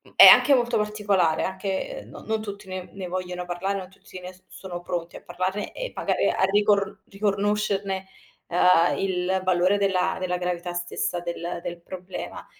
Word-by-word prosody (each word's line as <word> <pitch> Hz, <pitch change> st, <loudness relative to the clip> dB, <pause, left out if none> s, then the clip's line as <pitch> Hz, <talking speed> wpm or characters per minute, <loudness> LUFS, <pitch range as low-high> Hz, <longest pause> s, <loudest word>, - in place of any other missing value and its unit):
e -, -, +11 dB
anche 280 Hz, -2 st, +9 dB
molto 240 Hz, -2 st, +1 dB
particolare 205 Hz, -6 st, +1 dB
anche 190 Hz, -, -3 dB
non -, -, -11 dB
non 220 Hz, 0 st, -1 dB
tutti 200 Hz, -1 st, -8 dB
ne 185 Hz, -1 st, -6 dB
ne 190 Hz, -2 st, -6 dB
vogliono 180 Hz, -1 st, -4 dB
parlare, 190 Hz, +3 st, -2 dB
non 185 Hz, -1 st, -7 dB
tutti 190 Hz, -1 st, -12 dB
ne 180 Hz, +1 st, -9 dB
so 185 Hz, 0 st, -23 dB
sono 175 Hz, -2 st, -8 dB
pronti 175 Hz, -1 st, -4 dB
a -, -, -13 dB
parlarne 190 Hz, +3 st, -3 dB
e -, -, -5 dB
magari -, -, +1 dB
a -, -, 0 dB
ricor 200 Hz, -1 st, +2 dB
riconoscerne, 200 Hz, -1 st, -1 dB, 0.4 s
uhm, 175 Hz, -1 st, +4 dB
il 190 Hz, 0 st, 0 dB
valore 185 Hz, +2 st, +3 dB
della 190 Hz, -2 st, +1 dB
della 180 Hz, -1 st, -1 dB
gravità 175 Hz, 0 st, -3 dB
stessa 175 Hz, 0 st, -2 dB
del 170 Hz, 0 st, -4 dB
del 175 Hz, -1 st, -6 dB
problema. 185 Hz, +1 st, -7 dB
190 Hz, 165 wpm, -25 LUFS, 180-200 Hz, 0.4 s, e